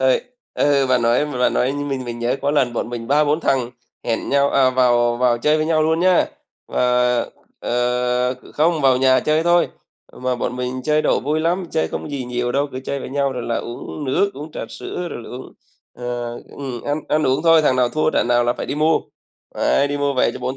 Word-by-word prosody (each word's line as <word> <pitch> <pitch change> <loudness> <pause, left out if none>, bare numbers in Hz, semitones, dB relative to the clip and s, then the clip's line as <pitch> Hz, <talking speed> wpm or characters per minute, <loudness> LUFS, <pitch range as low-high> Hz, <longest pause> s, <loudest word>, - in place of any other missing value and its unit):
Rồi, 130 0 +3 0.3
ờ, 140 -2 +2
bạn 125 -2 +2
nói 120 +5 +2
bạn 125 -4 0
nói 125 +2 +1
mình 140 -2 -3
mới 120 - -4
nhớ 120 +2 -1
có 140 - +1
lần 135 -5 +1
bọn 115 - -3
mình 120 -1 -6
ba, 150 +2 +4
bốn 150 +2 +1
thằng 130 -5 0 0.3
hẹn 115 -1 -2
nhau, 140 0 +3
à, 130 -2 +4
vào 120 -2 +3
vào 120 -1 +2
chơi 150 +5 +2
với 155 0 0
nhau 160 -1 +2
luôn 160 +1 +1
nhá, 185 0 +4 0.4
và, - - -2 0.8
ờ 125 +1 0 0.2
không, 160 +1 +2
vào 130 -2 +4
nhà 130 0 +4
chơi 155 +1 +1
thôi, 175 0 +3 0.4
mà 125 0 -2
bọn 125 +1 -3
mình 125 +1 -3
chơi 155 +2 +2
độ - - +2
vui 150 +4 -1
lắm. 175 +3 0
Chơi 160 - 0
không - - -5
gì 135 -3 -4
nhiều 120 0 -2
đâu, 140 +1 +1
cứ 130 - -5
chơi 140 - -3
với - - -6
nhau 140 -1 0
rồi 125 -2 -5
là 115 - -2
uống 120 +5 -6
nước, 185 +10 +1
uống 150 +3 -8
trà - - -5
sữa, 180 -1 -6
rồi 120 - -6
là - - -11
uống, 125 +1 -9 0.4
ờ 120 -1 -4 0.2
ừm, 130 -4 -5
ăn 145 +1 -2
ăn 155 - +2
uống 130 +1 +1
thôi, 165 -1 +5
thằng 130 -3 +2
nào 125 -1 +3
thua 155 +3 0
trận - - 0
nào 120 0 +3
là 120 - +2
phải - - -6
đi - - -3
mua, 155 +2 +2 0.5
ấy, 140 +1 +2
đi 145 - -2
mua 145 -1 0
về 130 - +2
cho - - -7
bốn 130 +1 -3
130 Hz, 235 wpm, -20 LUFS, 125-150 Hz, 0.8 s, thôi